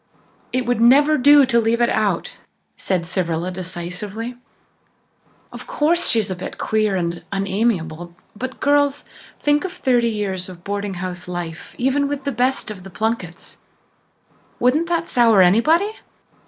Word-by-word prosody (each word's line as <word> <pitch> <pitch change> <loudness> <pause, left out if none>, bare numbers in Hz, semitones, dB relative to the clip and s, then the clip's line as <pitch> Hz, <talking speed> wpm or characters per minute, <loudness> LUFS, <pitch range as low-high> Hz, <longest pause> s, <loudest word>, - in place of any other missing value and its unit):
"It 255 0 -1
would 245 -1 0
never 285 +6 +6
do 285 +1 +6
to 235 -2 +2
leave 225 +1 +1
her 240 0 +2
out," 205 -5 -1 0.4
said 180 -3 -2
Cyrilla 170 0 -2
decisively. 185 +6 -6 1.2
"Of - - -10
course, 340 +4 +1
she's 220 -4 +1
a - - -2
bit 180 - -7
queer 215 -2 0
and 170 -2 -2
unamiable, 190 -4 -2 0.2
but, 260 +5 -6
girls, 285 0 +2 0.3
think 295 0 +2
of 375 - -4
thirty 245 -7 +1
years 195 -4 -3
of 175 -2 -12
boarding 200 0 -3
house 180 -1 -6
life, 175 -2 -6
even 270 +3 +1
with 285 -1 -4
the 280 - -1
best 250 -1 0
of 195 -3 -9
Plunketts. 195 -2 -4 1.0
Wouldn't 290 +7 +2
that 340 -1 0
sour 230 -5 +5
anybody? 310 - +3
220 Hz, 140 wpm, -20 LUFS, 185-265 Hz, 1.2 s, never